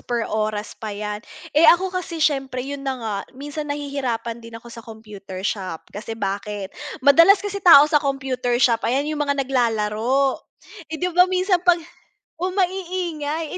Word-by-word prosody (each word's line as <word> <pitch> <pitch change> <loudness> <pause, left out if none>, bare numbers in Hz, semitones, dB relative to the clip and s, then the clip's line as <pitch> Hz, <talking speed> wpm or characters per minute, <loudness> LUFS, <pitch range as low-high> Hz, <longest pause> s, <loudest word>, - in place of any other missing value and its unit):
per 240 -2 -2
oras 215 0 -2
pa 215 -2 -7
yan, 210 0 -4 0.3
eh, 310 +3 +6
ako 370 +2 +4
kasi 365 -2 -4
siyempre 270 -3 -1
yun 280 0 -6
na 270 -1 -3
nga 220 -4 -4 0.2
minsan 290 +2 -6
nahihirapan 275 -5 -3
din 230 0 -10
ako 235 +1 -12
sa 230 - -9
computer 210 -4 -10
shop, 185 -6 -3
kasi 220 +2 -6
bakit, 200 -1 -4 0.3
madalas 335 +8 +7
kasi 405 0 -4
tao 335 -6 +9
sa 300 -1 +2
computer 265 -3 -1
shop, 235 -2 +3
ayan 265 +4 +1
yung 300 0 -3
mga 280 -1 0
naglalaro. 240 +1 0 0.5
Eh, 320 - -4
'di 360 +2 -2
ba 360 +1 +5
minsan 370 0 +1
pag 355 -1 +4 0.6
o 365 +2 -2
maiingay, 355 -5 -2
270 Hz, 165 wpm, -22 LUFS, 225-320 Hz, 0.6 s, tao